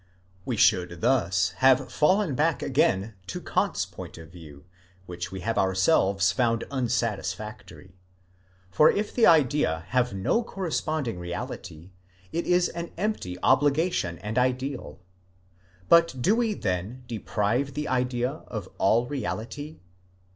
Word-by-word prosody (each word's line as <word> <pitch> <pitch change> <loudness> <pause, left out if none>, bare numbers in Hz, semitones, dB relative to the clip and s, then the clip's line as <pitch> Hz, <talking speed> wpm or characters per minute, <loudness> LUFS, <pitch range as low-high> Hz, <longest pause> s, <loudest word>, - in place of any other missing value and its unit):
We 120 - -2
should 90 -4 +2
thus 95 -7 +2
have 130 0 +4
fallen 185 +1 +2
back 155 +4 +1
again 110 -6 +1
to 100 - -5
Kant's - - -1
point - - -10
of 80 -1 -12
view, 75 -5 -13 0.4
which 90 +1 -6
we 95 -1 -6
have 115 +5 -1
ourselves 95 - +2
found 115 +3 +1
unsatisfactory: 110 -6 -3 0.7
for 150 - +6
if 210 +1 -1
the 235 - +4
idea 135 - +3
have 125 -1 +1
no 100 - 0
corresponding 155 - -3
reality, 85 0 -7 0.4
it 170 - -2
is 180 0 +3
an 170 0 -6
empty 180 - -2
obligation 140 - +2
and 110 +4 -2
ideal. 130 - -2 0.9
But 165 -6 +4
do 195 - +3
we 230 -3 0
then 100 - -3
deprive 120 +3 -1
the 150 0 -3
idea 125 +2 -1
of 105 -5 -6
all 115 +5 +3
reality? 145 +2 -5
120 Hz, 125 wpm, -26 LUFS, 95-145 Hz, 0.9 s, for